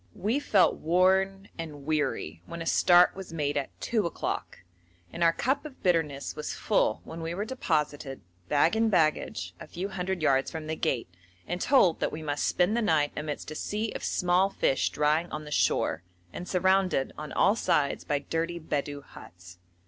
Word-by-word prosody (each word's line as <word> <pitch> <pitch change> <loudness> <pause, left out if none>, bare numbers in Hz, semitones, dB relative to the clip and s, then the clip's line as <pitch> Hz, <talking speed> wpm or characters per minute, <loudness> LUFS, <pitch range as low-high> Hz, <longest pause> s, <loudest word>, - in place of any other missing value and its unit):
We 225 +8 0
felt 205 -9 +3
worn 190 +3 +2
and 150 -4 -7
weary 145 - -1
when 170 - -7
a 165 - -5
start 175 +1 +5
was 190 -2 -8
made 145 -3 -1
at 140 -2 -1
two 215 -6 0
o'clock, - - -4 0.5
and 170 - -1
our 165 - +6
cup 265 +10 0
of 300 -4 -11
bitterness 160 -6 0
was 150 - -4
full - - +1
when 165 +1 -8
we 165 +1 -3
were 205 +3 -2
deposited, 150 - -2 0.3
bag 150 +6 +3
and 225 0 +2
baggage, 155 - +1
a - - -9
few 185 +3 -5
hundred 190 -2 -3
yards 135 -2 +3
from 160 -1 -6
the 160 +1 -3
gate, 125 -6 -1 0.4
and 180 +1 -3
told 225 - +4
that - - 0
we 155 +1 -6
must 145 -1 -1
spend 180 +5 +2
the 235 - +1
night 155 -8 +2
amidst 150 0 -5
a - - -6
sea 215 +6 -2
of - - -6
small 180 +2 +2
fish 135 - +1
drying 155 +3 +1
on 155 0 -5
the 150 - -9
shore, 80 - +1 0.3
and 180 - -6
surrounded 185 -5 +2
on 150 -1 -7
all 200 +3 +3
sides 165 -10 +1
by 145 - 0
dirty 165 +4 -2
Bedou 145 -2 -3
huts. 90 0 -14
165 Hz, 185 wpm, -28 LUFS, 150-190 Hz, 0.5 s, our